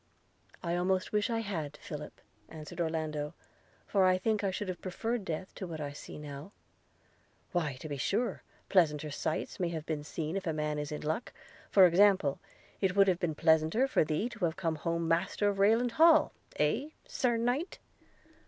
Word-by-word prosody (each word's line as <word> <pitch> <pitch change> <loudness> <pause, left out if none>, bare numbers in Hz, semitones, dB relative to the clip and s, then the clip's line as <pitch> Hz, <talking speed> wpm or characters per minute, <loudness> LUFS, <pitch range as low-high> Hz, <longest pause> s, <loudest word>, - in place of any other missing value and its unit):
'I 170 0 0
almost 185 +2 0
wish 210 +1 +1
I 230 -1 0
had, 160 -9 -4
Philip,' - - -8 0.3
answered 155 +2 -7
Orlando, 155 -1 -2 0.5
'for 195 -2 +2
I 185 0 +5
think 210 +2 0
I 195 - +2
should 190 +2 -3
have 185 -1 -5
preferred 225 +5 -2
death 185 +1 -5
to 190 - -6
what 160 -2 -6
I 145 -1 -3
now - - -8
see.' 145 +3 -9 1.0
"Why, 155 -7 -1
to 130 - -8
be 145 -2 -4
sure, 220 - -1 0.3
pleasanter 150 -5 +2
sights 155 +2 -3
may 170 -2 -1
be 155 -1 -4
seen 155 +2 -4
if 195 -2 -4
a 160 - 0
man 150 -1 -1
is 150 +1 -4
in 150 - -4
luck 160 +10 -3 0.2
– - - -23
For 190 -2 +7
example, 180 -4 +4 0.4
it 190 -2 +1
would 200 0 +6
have 180 -2 +2
been 170 -4 -1
pleasanter 160 - +3
for 270 - +3
thee 155 +8 -1
to 225 -6 -2
have 160 -1 -1
come 165 -3 -1
home 170 +2 -1
master 175 +5 +1
of 200 -1 -3
Rayland 225 +5 +4
Hall 320 +5 +5
– - - -25
Eh! 220 - +1 0.2
Sir 240 -3 +1
Knight?' 245 +9 -1
175 Hz, 190 wpm, -31 LUFS, 155-205 Hz, 1.0 s, For